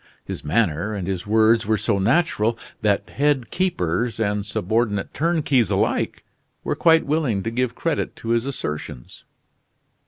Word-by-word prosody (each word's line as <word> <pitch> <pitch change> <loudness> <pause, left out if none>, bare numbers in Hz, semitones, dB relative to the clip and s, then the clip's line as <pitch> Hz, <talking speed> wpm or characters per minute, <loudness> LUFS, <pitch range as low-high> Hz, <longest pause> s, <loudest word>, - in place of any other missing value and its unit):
His - - -6
manner 90 +4 0
and 95 -3 -4
his 95 0 -3
words 110 +1 +3
were 110 0 +2
so 105 -1 0
natural 115 - +2 0.2
that 105 -2 +1
head 140 -3 0
keepers 115 - -1
and 105 -2 0
subordinate 105 +1 -1
turnkeys 145 - +1
alike 95 -1 0 0.4
were - - -1
quite 165 -1 +4
willing 140 -10 0
to 115 - -2
give 125 0 -1
credit 165 -4 -2
to 115 - -7
his 115 +2 +1
assertions. 75 - -6
110 Hz, 145 wpm, -22 LUFS, 100-130 Hz, 0.4 s, quite